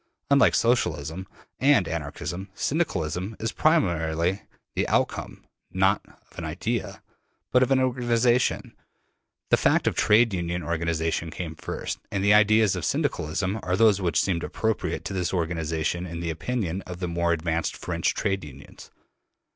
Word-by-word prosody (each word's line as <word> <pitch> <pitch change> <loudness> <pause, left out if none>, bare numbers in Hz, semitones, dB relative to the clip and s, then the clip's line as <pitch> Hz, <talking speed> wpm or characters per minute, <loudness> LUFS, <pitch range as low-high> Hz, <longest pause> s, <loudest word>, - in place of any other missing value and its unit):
Unlike 140 -1 +5
Socialism 90 - 0 0.3
and 135 - +4
Anarchism, 85 +4 -5
Syndicalism 95 - -2
is 115 - -2
primarily 85 - +1 0.3
the - - 0
outcome, - - -1 0.3
not 95 +2 +2 0.3
of - - -10
an - - -5
idea, - - -3 0.5
but 125 - +4
of 130 - +3
an 135 -1 +4
organization: 120 -1 +1 0.8
the - - +6
fact - - +2
of - - +1
Trade 110 +1 +4
Union 85 -1 -2
organization 85 0 -1
came 80 0 -5
first, 80 - -5
and 100 -1 -1
the 100 +1 +5
ideas 105 -1 +5
of - - -4
Syndicalism 95 +7 -1
are 90 0 -1
those 105 -3 +4
which 85 -4 +1
seemed 85 -3 0
appropriate 110 -1 -2
to - - -4
this 90 -2 -1
organization 80 0 -1
in 85 0 -6
the 85 -1 -2
opinion 95 0 -3
of 90 -1 -7
the 90 - -2
more 85 0 0
advanced 85 0 -1
French - - -1
Trade 95 -3 -1
Unions. 70 -2 -12
90 Hz, 145 wpm, -25 LUFS, 85-110 Hz, 0.8 s, the